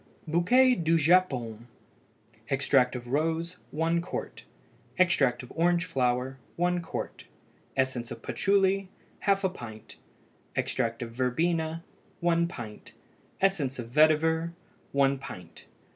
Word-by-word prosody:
BOUQUET 205 +7 +4
DU 165 +1 +4
JAPON. 135 -9 +2 0.8
Extract 135 -2 +3
of 120 -1 -6
rose 165 +5 -1
1 165 +2 0
qt. 175 - -6 0.6
Extract 135 -9 +3
of 125 - -11
orange 175 +2 +2
flower 130 -2 0 0.2
1 175 0 +1
qt. 165 - -6 0.5
Essence 130 -3 0
of - - -8
patchouly 195 -1 +2 0.4
½ 195 -2 +2
pint. 110 - -10 0.6
Extract 120 0 -1
of 115 - -7
verbena 160 +6 0 0.4
1 170 0 +2
pint. 110 -10 -9 0.5
Essence 160 -9 +1
of 120 -2 -7
vetiver 160 +3 +3 0.4
1 140 -1 +2
pint. 90 -10 -10
160 Hz, 110 wpm, -28 LUFS, 125-175 Hz, 0.8 s, BOUQUET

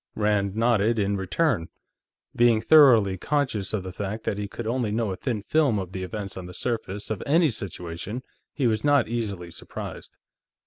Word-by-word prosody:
Rand 105 -2 +1
nodded 115 -1 +2
in 100 -1 +1
return. 95 - 0 0.7
Being 120 -2 +4
thoroughly 115 - +6
conscious 130 -9 -1
of 105 -4 -2
the 95 - -6
fact 100 +4 -5
that 100 - -2
he 105 - -3
could 115 +3 -7
only 115 -1 -1
know 110 -1 0
a - - -3
thin 110 -1 -3
film 145 -2 +2
of 95 -2 -4
the 95 - -5
events 100 +1 -5
on 90 -1 -6
the 90 - -10
surface 110 -3 -3
of 105 - -3
any 160 0 +4
situation, 95 +3 -6 0.3
he 140 - -1
was 110 -2 +1
not 145 -4 +4
easily 100 -7 -4
surprised. - - -8
110 Hz, 180 wpm, -25 LUFS, 95-120 Hz, 0.7 s, thoroughly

